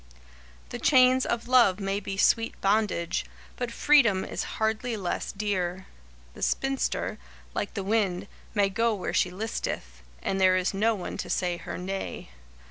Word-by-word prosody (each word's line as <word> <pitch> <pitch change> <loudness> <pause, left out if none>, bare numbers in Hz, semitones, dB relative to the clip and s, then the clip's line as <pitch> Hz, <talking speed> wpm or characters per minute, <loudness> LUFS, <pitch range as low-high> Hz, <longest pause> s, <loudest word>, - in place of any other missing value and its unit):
The - - -6
chains 255 -1 +5
of 235 0 -2
love 235 -7 +5
may 195 0 -1
be 195 -1 -5
sweet 225 +3 +2
bondage, 200 -4 +1 0.3
but 245 -1 -3
freedom 235 -8 +4
is - - -3
hardly 220 +2 0
less 185 -3 -3
dear. 190 -3 -2 0.5
The - - -12
spinster, 270 0 -1 0.3
like 205 - -3
the 200 - -2
wind, 195 -3 0 0.3
may 200 -1 +3
go 230 +2 +1
where 190 - -4
she 180 - +2
listeth, 180 - -4 0.2
and 195 0 -1
there 185 0 +5
is 185 +1 0
no 220 +3 +2
one 185 - -6
to - - -5
say 175 -1 0
her - - -6
nay. 190 - -5
200 Hz, 155 wpm, -27 LUFS, 185-230 Hz, 0.5 s, chains